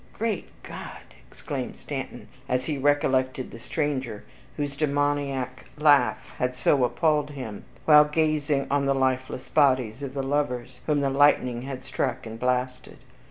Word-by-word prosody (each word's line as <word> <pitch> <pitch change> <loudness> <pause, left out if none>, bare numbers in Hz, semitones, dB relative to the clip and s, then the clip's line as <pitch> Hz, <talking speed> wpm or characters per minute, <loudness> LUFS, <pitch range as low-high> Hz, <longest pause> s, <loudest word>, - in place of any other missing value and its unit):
"Great 220 -4 -2 0.2
G - - -10
d!" - - -9
exclaimed - - -5
Stanton, - - -6 0.2
as 125 0 0
he 150 -3 -2
recollected 130 -2 +1
the 115 - -10
stranger 130 -5 -2 0.3
whose 145 -1 -2
demoniac 140 -3 -1
laugh 145 -6 +5 0.2
had 125 0 0
so 130 +1 +3
appalled 150 +3 +1
him, 125 -8 -7 0.2
while 150 -1 +8
gazing 150 -2 +1
on 140 -1 +2
the 135 - +2
lifeless 130 -1 -1
bodies 130 -5 +2
of 140 -1 -6
the 135 - -1
lovers, 130 -3 -2
whom 150 -2 +2
the 135 -1 +1
lightning 135 -4 +3
had 130 0 -6
struck 130 -3 -2
and 110 0 -8
blasted. 125 0 -2
135 Hz, 150 wpm, -26 LUFS, 125-145 Hz, 0.3 s, while